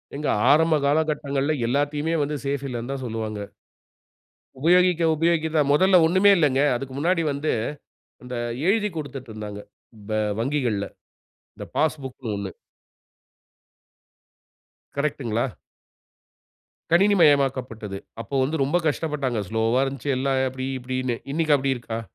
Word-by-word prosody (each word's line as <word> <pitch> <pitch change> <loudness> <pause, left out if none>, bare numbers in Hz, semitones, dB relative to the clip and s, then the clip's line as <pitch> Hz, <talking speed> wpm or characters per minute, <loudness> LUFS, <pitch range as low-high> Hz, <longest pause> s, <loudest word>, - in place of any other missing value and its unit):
ஏங்க 150 +1 -2 0.2
ஆரம்ப 160 +1 +4
காலகட்டங்கள்ல 145 -1 +1
எல்லாத்தையுமே 145 +5 0
வந்து 145 +1 -1
சேஃப் 140 0 -2
இல்லைன்னு 120 0 -4
தான் 135 -1 -5
சொல்லுவாங்க. 110 -2 -4 1.2
உபயோகிக்க 180 +2 +4
உபயோகிக்க 165 0 +1
தான். 145 -2 +2
முதல்ல 185 +3 +5
ஒண்ணுமே 190 +4 +5
இல்லைங்க. 140 -4 +3
அதுக்கு 130 +2 -5
முன்னாடி 170 +3 +1
வந்து, 145 +2 -1 0.7
அந்த 125 0 -7 0.3
எழுதிக் 210 -3 +1
கொடுத்துட்டுருந்தாங்க. 110 -8 -7 0.5
ப - - -2 0.3
வங்கிகள்ல, 120 -7 -1 0.7
இந்த - - -8
பாஸ்புக்ன்னு 135 -7 -2
ஒண்ணு. 100 -1 -4 2.5
கரெக்ட்டுங்களா? 135 -5 -1 1.4
கணினி 200 +4 +5
மயமாக்கப்பட்டது. 130 -9 +2 0.2
அப்போ 140 - -6
வந்து 145 +5 -1
ரொம்ப 145 +6 +1
கஷ்டப்பட்டாங்க. 140 -6 -1
ஸ்லோவா 115 +3 +1
இருந்துச்சு 140 +1 -2
எல்லாம், 135 0 +1
"அப்டி 130 0 -5
இப்டீன்னு" 130 -1 -2 0.2
இன்னைக்கு 155 -1 +2
அப்டி 135 0 -1
இருக்கா? 115 -2 -5
140 Hz, 110 wpm, -24 LUFS, 125-155 Hz, 2.5 s, முதல்ல